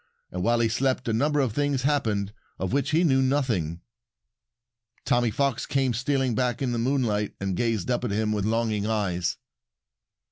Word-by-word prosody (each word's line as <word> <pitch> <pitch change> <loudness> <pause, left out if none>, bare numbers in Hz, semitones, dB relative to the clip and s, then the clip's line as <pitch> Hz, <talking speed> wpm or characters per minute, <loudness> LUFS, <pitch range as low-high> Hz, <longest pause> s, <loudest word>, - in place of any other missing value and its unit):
And 90 - -4
while 115 +4 +2
he 115 - +3
slept 130 +3 0
a 115 - +1
number 145 +6 +1
of 130 -6 +1
things 145 -1 0
happened 110 -8 0 0.2
of 95 +4 -3
which 140 -2 +1
he 165 +3 +3
knew 135 -5 +3
nothing. 115 - 0 1.2
Tommy 120 -2 +2
Fox 135 +2 -1
came 135 -3 +1
stealing 130 +1 0
back 125 +3 0
in 130 -3 -1
the 120 - -1
moonlight 115 -5 0
and 95 -1 -2
gazed 115 0 0
up 120 - 0
at 120 - -1
him 105 +1 0
with 105 -2 -1
longing 110 -1 0
eyes. 95 -6 -1
120 Hz, 175 wpm, -26 LUFS, 105-135 Hz, 1.2 s, he